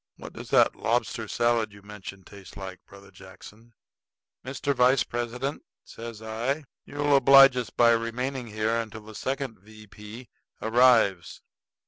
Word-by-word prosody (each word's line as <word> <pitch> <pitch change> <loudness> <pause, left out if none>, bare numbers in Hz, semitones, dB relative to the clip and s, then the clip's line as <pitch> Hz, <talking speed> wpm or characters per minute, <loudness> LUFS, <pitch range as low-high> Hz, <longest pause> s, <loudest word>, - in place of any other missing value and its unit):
What - - -11
does - - -10
that - - +4
lobster - - -2
salad 120 -2 0
you 100 0 -16
mentioned 100 -2 -10
taste 100 -1 -14
like, 95 -2 -8
Brother 100 0 -16
Jackson?" 105 +5 -15 0.7
"Mr. 140 +2 -2
Vice 125 0 +3
President," 120 +4 -4 0.2
says 115 -1 -10
I, 120 +7 -3 0.2
"you'll 145 0 0
oblige 135 0 +7
us 125 -2 -3
by 120 -1 +4
remaining 120 +3 -2
here 110 +2 -1
till 110 0 -11
the 110 +1 -13
second 130 0 -4
V. 110 +2 -15
P. 105 +4 -12 0.3
arrives. 110 -5 +2
115 Hz, 140 wpm, -26 LUFS, 105-125 Hz, 0.7 s, oblige